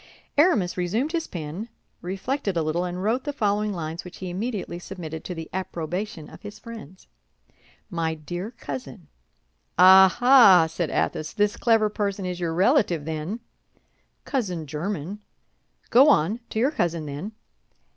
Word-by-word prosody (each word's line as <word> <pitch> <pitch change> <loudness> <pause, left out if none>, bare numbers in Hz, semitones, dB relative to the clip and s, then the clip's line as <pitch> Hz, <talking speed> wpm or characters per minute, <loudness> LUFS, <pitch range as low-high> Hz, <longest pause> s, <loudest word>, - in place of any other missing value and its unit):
Aramis 290 - +3
resumed 215 - 0
his 330 -1 -2
pen, 170 +7 -6 0.3
reflected 195 +3 -2
a 165 - +1
little, 155 +3 0
and 180 +1 -4
wrote 235 +5 +1
the 290 - -2
following 210 -5 0
lines, 165 -2 -5
which 180 - -11
he 185 -1 -5
immediately 200 -2 -4
submitted 165 -4 -7
to 180 - -5
the 165 -1 -6
approbation 175 -1 -4
of - - -13
his 205 0 -9
friends. 215 -6 -11 0.8
"My 165 -2 -2
dear 175 +6 -6
cousin." 135 - -8 0.7
"Ah, 190 +1 +8
ah!" 245 -9 +8
said 160 0 -3
Athos. 155 0 -1
"This 205 0 +1
clever 225 -2 +3
person 200 -2 -2
is 180 -1 -4
your 165 -2 -2
relative, 190 - +2
then?" 160 +8 -4 0.8
"Cousin 185 - -2
german." 170 +5 -4 0.7
"Go 265 +5 +7
on, 210 - +3
to - - -6
your 255 +6 +3
cousin, 170 - -1
then!" 150 +9 -6
185 Hz, 145 wpm, -25 LUFS, 165-215 Hz, 0.8 s, Ah